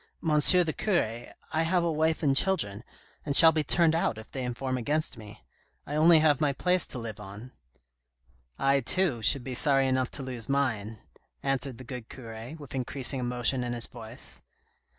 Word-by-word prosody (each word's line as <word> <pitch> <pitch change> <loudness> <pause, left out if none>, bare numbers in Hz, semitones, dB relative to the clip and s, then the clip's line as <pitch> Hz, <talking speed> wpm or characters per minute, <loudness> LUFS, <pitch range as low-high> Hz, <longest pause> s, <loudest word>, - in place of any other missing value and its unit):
the 160 +1 +3
cure, 120 - -2 0.3
I 160 - +1
have 170 +2 +1
a 170 - 0
wife 160 +1 0
and 140 -2 +2
children, 115 - +1 0.4
and 140 -2 -2
shall 165 +2 +11
be 155 -1 -1
turned 165 +2 +3
out 165 -9 -1
if 110 - -12
they 130 - -5
inform 130 +1 -4
against 145 +5 -2
me. 105 - -13 0.4
I 145 - -7
only 160 +2 +6
have 155 -2 +2
my 145 -2 +1
place 180 +5 0
to - - -7
live 115 -3 -7
on." 105 +5 -11 0.6
" - - -40 0.2
I, 140 0 +2
too, 135 -1 0
should 130 +4 +1
be 130 - -6
sorry 135 +1 +3
enough 130 -1 0
to 140 - -7
lose 125 -3 -5
mine," 115 -6 -1 0.5
answered 135 -2 -2
the 130 - -11
good 125 -2 -9
cure, 115 +2 -9
with 145 -4 -12
increasing 130 +1 0
emotion 125 +1 -1
in 120 0 -4
his 120 -1 0
voice. 115 +2 -5
130 Hz, 185 wpm, -27 LUFS, 120-155 Hz, 0.6 s, shall